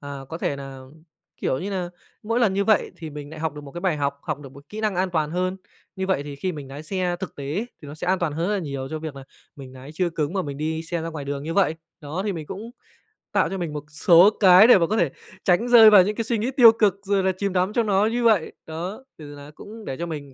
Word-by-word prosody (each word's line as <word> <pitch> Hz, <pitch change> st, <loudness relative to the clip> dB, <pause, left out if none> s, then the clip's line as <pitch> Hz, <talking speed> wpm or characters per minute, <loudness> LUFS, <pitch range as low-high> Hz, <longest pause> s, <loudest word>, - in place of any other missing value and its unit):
à, 140 Hz, -1 st, -7 dB
có 165 Hz, -, -6 dB
thể 140 Hz, -, -2 dB
nà, 135 Hz, -1 st, -8 dB, 0.6 s
kiểu 130 Hz, -, -1 dB
như 195 Hz, +7 st, -4 dB
nà, 180 Hz, -3 st, -3 dB, 0.3 s
mỗi 230 Hz, +3 st, 0 dB
lần 205 Hz, -5 st, +3 dB
như 200 Hz, 0 st, +1 dB
vậy 215 Hz, -2 st, +2 dB
thì 160 Hz, -3 st, -8 dB
mình 145 Hz, 0 st, -8 dB
lại 160 Hz, -1 st, -9 dB
học 160 Hz, -2 st, -2 dB
được 150 Hz, -, -8 dB
một 140 Hz, -, -11 dB
cái 175 Hz, -, -6 dB
bài 175 Hz, -4 st, 0 dB
học, 140 Hz, -1 st, -2 dB
học 150 Hz, -3 st, -3 dB
được 135 Hz, -2 st, -11 dB
một 140 Hz, +1 st, -15 dB
kỹ 215 Hz, -, -7 dB
năng 215 Hz, -2 st, 0 dB
an 185 Hz, +1 st, 0 dB
toàn 155 Hz, -3 st, 0 dB
hơn, 185 Hz, +2 st, -1 dB, 0.4 s
như 190 Hz, 0 st, -2 dB
vậy 190 Hz, -7 st, 0 dB
thì 145 Hz, -1 st, -8 dB
khi 185 Hz, +6 st, -3 dB
mình 145 Hz, -4 st, -8 dB
nái 140 Hz, +3 st, -8 dB
xe 180 Hz, +1 st, -2 dB
thực 190 Hz, -, -6 dB
tế 140 Hz, -, -7 dB
ấy 215 Hz, +5 st, -2 dB, 0.2 s
thì 145 Hz, -, -9 dB
nó 145 Hz, -, -8 dB
sẽ 155 Hz, -, -6 dB
an 185 Hz, 0 st, +2 dB
toàn 165 Hz, -4 st, -1 dB
hơn 165 Hz, +5 st, -2 dB
rất 210 Hz, -, +1 dB
là -, -, 0 dB
nhiều 140 Hz, -4 st, -5 dB
cho 155 Hz, -, -3 dB
việc 155 Hz, -3 st, -7 dB
là 135 Hz, -, -9 dB, 0.3 s
mình 135 Hz, -2 st, -10 dB
nái 130 Hz, +2 st, -11 dB
chưa 175 Hz, +1 st, 0 dB
cứng 155 Hz, 0 st, -2 dB
mà 190 Hz, -2 st, -1 dB
mình 140 Hz, -2 st, -6 dB
đi 160 Hz, +1 st, -2 dB
xe 170 Hz, 0 st, -4 dB
ra 165 Hz, -, -4 dB
ngoài 155 Hz, -4 st, -6 dB
đường 140 Hz, 0 st, -4 dB
như 165 Hz, +2 st, -4 dB
vậy. 185 Hz, -5 st, +3 dB, 0.3 s
Đó, 155 Hz, +5 st, -4 dB
thì 205 Hz, -, -1 dB
mình 160 Hz, -4 st, -6 dB
cũng 220 Hz, +5 st, -7 dB, 0.6 s
tạo -, -, +2 dB
cho 195 Hz, -, -4 dB
mình 165 Hz, -4 st, -4 dB
một 150 Hz, -, -5 dB
số 170 Hz, +5 st, +6 dB
cái 190 Hz, +2 st, +8 dB
để 245 Hz, -, +8 dB
mà 170 Hz, -2 st, +2 dB
có 215 Hz, +4 st, 0 dB
thể 170 Hz, -8 st, +2 dB, 0.3 s
tránh 190 Hz, +7 st, +2 dB
rơi 230 Hz, -3 st, +9 dB
vào 205 Hz, -4 st, +8 dB
những 210 Hz, +3 st, -2 dB
cái 230 Hz, -, -2 dB
suy 230 Hz, +1 st, -1 dB
nghĩ 235 Hz, +5 st, -1 dB
tiêu 245 Hz, -4 st, +8 dB
cực 210 Hz, -4 st, +2 dB
rồi 195 Hz, -1 st, +1 dB
là 190 Hz, -, +2 dB
chìm 200 Hz, -1 st, -2 dB
đắm 185 Hz, +3 st, +1 dB
trong 235 Hz, -2 st, +1 dB
nó 200 Hz, 0 st, +3 dB
như 235 Hz, +2 st, 0 dB
vậy. 215 Hz, -8 st, +3 dB
Đó, 180 Hz, +10 st, -6 dB
từ 145 Hz, -2 st, -10 dB
là 145 Hz, +1 st, -11 dB
cũng 220 Hz, +1 st, -11 dB
để 130 Hz, -, -5 dB
cho 170 Hz, -, -3 dB
mình 145 Hz, -5 st, -7 dB
170 Hz, 300 wpm, -23 LUFS, 145-200 Hz, 0.6 s, rơi